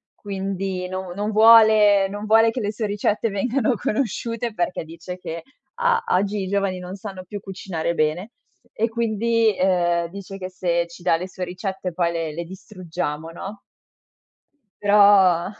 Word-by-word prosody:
Quindi 195 -2 -4
no 185 0 -5
non 205 +3 -2
vuole 215 -2 +6
non 205 +1 -6
vuole 225 +1 +5
che 250 - -4
le 210 0 -1
sue 215 +1 -3
ricette 210 +2 0
vengano 240 +5 0
conosciute 230 +1 -2
perché 175 -3 -2
dice 170 +3 -8
che: 165 -2 -7 0.3
"Ah, 475 0 +2
oggi 200 +2 +1
i - - -4
giovani 195 -1 -1
non 180 +1 -7
sanno 190 -2 -8
più 205 +3 -7
cucinare 185 -4 -4
bene." 165 +9 -1 0.4
E 225 +2 0
quindi, 230 -1 +1
ehm, 175 -2 +2
dice 195 +1 -9
che 185 -1 -6
se 170 -2 -1
ci 170 +1 -14
dà 165 - +3
le 180 +2 -5
sue 185 - -6
ricette 185 0 -5
poi 170 0 0
le 165 -2 -3
le 170 +3 -4
distruggiamo, 175 -4 -6
no? 195 +4 -8 1.2
Però 200 -3 +5
195 Hz, 160 wpm, -22 LUFS, 180-215 Hz, 1.2 s, vuole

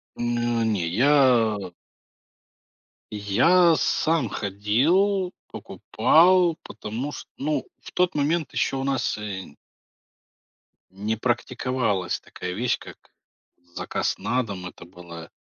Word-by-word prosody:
Ну, 120 -1 -1
не 105 -6 0
я. 115 - +3 1.4
Я 160 - +4
сам 155 -7 +1
ходил, 155 - +1
покупал, 170 +8 +3
потому 115 +7 -6
что, - - -9
ну, 150 +2 -2 0.2
в - - -11
тот 180 -1 +1
момент 150 +2 0
еще - - 0
у 135 - -2
нас, 135 -5 -1
э 95 -7 -7 1.4
не 105 +4 -3
практиковалась 120 -4 -1
такая 90 0 -7
вещь, 120 +5 -1
как - - -14 0.6
заказ - - -2
на 125 +1 0
дом. 95 -4 -7
Это 90 - -10
было 85 -2 -11
120 Hz, 105 wpm, -24 LUFS, 100-150 Hz, 1.4 s, Я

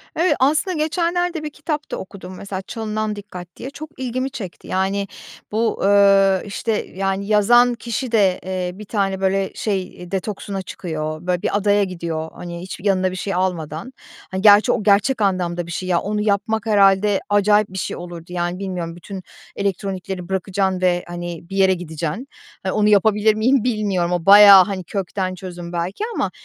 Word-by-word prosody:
Evet, 345 +3 +2
aslında 310 +7 +2
geçenlerde 340 +1 0
bir 305 - -3
kitap 300 0 -5
da - - -2
okudum 185 -1 -9
mesela, 195 -1 -5
"Çalınan 215 0 -3
Dikkat" 185 -3 -9
diye, 260 - -7
çok 300 +2 -9
ilgimi 255 +1 -2
çekti. 195 -10 -8
Yani, 195 +1 -1 0.4
bu, 225 +2 0
ııı, 195 -1 +5
işte, 210 +2 -3 0.2
yani, 195 +1 -1
yazan 240 +4 +5
kişi 235 +1 -4
de, 195 -5 +3
eee, 185 -1 -2
bir 210 +2 -10
tane, 195 -2 -1
böyle, 195 0 +1
şey 185 -4 -4
detoksuna 195 0 -4
çıkıyor, 155 -2 -5
böyle, 180 -1 0
bir - - 0
adaya 205 0 +3
gidiyor, 170 -4 -4
hani, 170 -1 -7
hiçbir 185 +1 -8
yanında 185 -2 +2
bir - - -6
şey 195 +2 -3
almadan. 175 - -3 0.4
Hani, 190 0 -2
gerçi 210 +3 +7
o 215 - -1
gerçek 210 +5 +3
anlamda 175 -3 0
bir - - -7
şey, 185 +2 -4
ya, 175 -2 +3
onu 210 +1 -2
yapmak 210 +1 0
herhâlde 200 -1 +4
acayip 205 +1 +3
bir 190 - -8
şey - - -3
olurdu, 175 -1 -8
yani, 175 0 -2
bilmiyorum, 180 -4 -4
bütün 190 +2 -8 0.3
elektronikleri 190 -2 -3
bırakacaksın 190 0 -1
ve, 175 -1 +2
hani, 175 -1 -7
bir 195 - -6
yere 190 -1 +5
gideceksin. 170 - -5 0.4
Onu 210 +1 +2
yapabilir 210 +1 +4
miyim, 240 +3 +2
bilmiyorum. 205 -7 0
O 175 -2 -1
bayağı, 200 -1 +10
hani, 195 -3 -4
kökten 185 0 -3
çözüm 175 -1 -8
belki 175 - -3
ama - - -1
195 Hz, 170 wpm, -20 LUFS, 180-210 Hz, 0.4 s, bayağı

